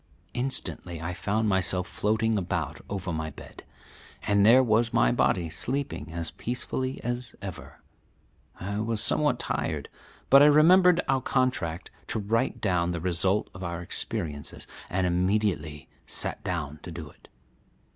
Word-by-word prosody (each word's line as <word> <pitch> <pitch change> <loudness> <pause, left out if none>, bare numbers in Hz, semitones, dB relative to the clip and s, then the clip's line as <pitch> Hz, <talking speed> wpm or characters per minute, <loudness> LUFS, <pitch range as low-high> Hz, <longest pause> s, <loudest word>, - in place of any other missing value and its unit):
Instantly 120 -9 -1
I 85 +3 -4
found 105 +5 -1
myself 95 -1 +1
floating 110 +2 0
about 90 -4 -2
over 95 -3 -3
my 80 0 -3
bed, - - -12 0.6
and 100 -1 +3
there 120 +5 +7
was 115 0 +2
my - - +4
body 85 +7 +1
sleeping 115 - -3
as 85 0 -3
peacefully 130 +2 -3
as 120 0 -4
ever. 95 -2 -8 0.8
I 100 +3 -3
was 110 0 -1
somewhat 145 +6 +3
tired, - - -2 0.4
but 135 +1 +9
I 145 - +8
remembered 175 +4 +6
our 135 -1 +2
contract 110 -13 -1 0.2
to - - -2
write 115 +5 0
down 90 -4 +1
the 85 - -3
result 95 +4 0
of 90 - -9
our 85 -1 -3
experiences, 85 -4 -4 0.2
and 90 0 0
immediately 90 -5 0 0.2
sat - - -2
down 75 -4 -3
to 85 - -8
do 80 -3 -8
it. - - -22
100 Hz, 145 wpm, -27 LUFS, 85-120 Hz, 0.8 s, but